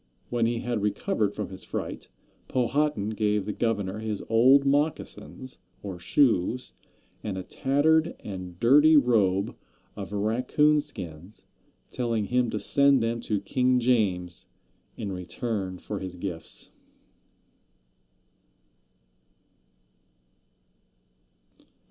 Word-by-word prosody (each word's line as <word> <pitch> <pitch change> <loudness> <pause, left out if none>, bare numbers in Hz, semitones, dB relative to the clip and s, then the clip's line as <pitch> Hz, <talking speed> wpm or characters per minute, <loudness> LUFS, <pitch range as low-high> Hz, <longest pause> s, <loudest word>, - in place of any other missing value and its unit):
When 120 -2 +2
he 120 0 -1
had 120 -3 -2
recovered 105 0 0
from 105 - -4
his 95 - -10
fright - - -5 0.4
Powhatan 130 -3 0
gave 105 -2 0
the 105 - -3
governor 105 -3 -1
his 110 -2 -4
old 130 +5 +5
moccasins, 140 -2 -2 0.2
or 95 -3 -6
shoes, 125 +2 +1 0.5
and 100 -3 -3
a 95 - -4
tattered 150 - +2
and 90 -3 -7
dirty 150 +6 +6
robe 105 -8 +2 0.4
of 100 -1 -7
raccoon 125 +9 +2
skins, 95 - -8 0.5
telling 115 -4 -1
him 125 +1 +1
to 110 - -2
send 140 +2 +3
them 115 +1 -1
to 105 -4 -1
King 125 +4 +2
James 100 -8 0 0.5
in 100 - -4
return 95 +1 -4
for 100 +2 -5
his 95 -1 -6
gifts! 85 -3 -6
110 Hz, 105 wpm, -27 LUFS, 100-130 Hz, 0.5 s, dirty